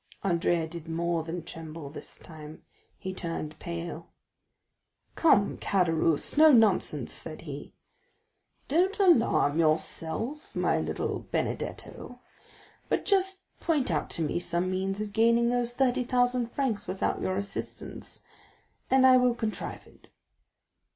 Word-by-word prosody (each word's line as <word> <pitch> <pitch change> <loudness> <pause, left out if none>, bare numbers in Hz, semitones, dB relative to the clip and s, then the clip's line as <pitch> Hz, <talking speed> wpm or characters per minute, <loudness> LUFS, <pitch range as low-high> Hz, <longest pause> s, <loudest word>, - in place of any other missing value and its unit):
Andrea 170 -3 +1
did 165 0 -9
more 170 0 0
than 165 +1 -5
tremble 160 -3 -8
this - - -10
time, 155 -1 -12 0.3
he 190 -1 -5
turned 160 -4 -5
pale. 170 -1 -6 1.1
"Come, 210 -11 +3
Caderousse, 165 - +1
no 310 0 +8
nonsense!" 220 -7 +3
said - - -7
he. - - -8 0.9
"Don't 365 +7 +2
alarm 230 - +4
yourself, 165 - -1
my - - +1
little - - -3
Benedetto, 245 - -4 0.7
but - - 0
just 380 -1 +2 0.2
point 300 - +1
out 155 - -1
to 165 - -2
me 155 - -1
some 175 +1 0
means 195 +2 -2
of 210 -1 -5
gaining 235 +2 +4
those 245 -1 0
thirty 250 0 +1
thousand 245 -1 +1
francs 260 -7 -1
without 185 +1 -1
your 185 - -1
assistance, 200 0 -6 0.7
and 265 0 +5
I 255 -1 +8
will 250 -1 +3
contrive 220 -3 -4
it." - - -21
195 Hz, 125 wpm, -28 LUFS, 165-245 Hz, 1.1 s, no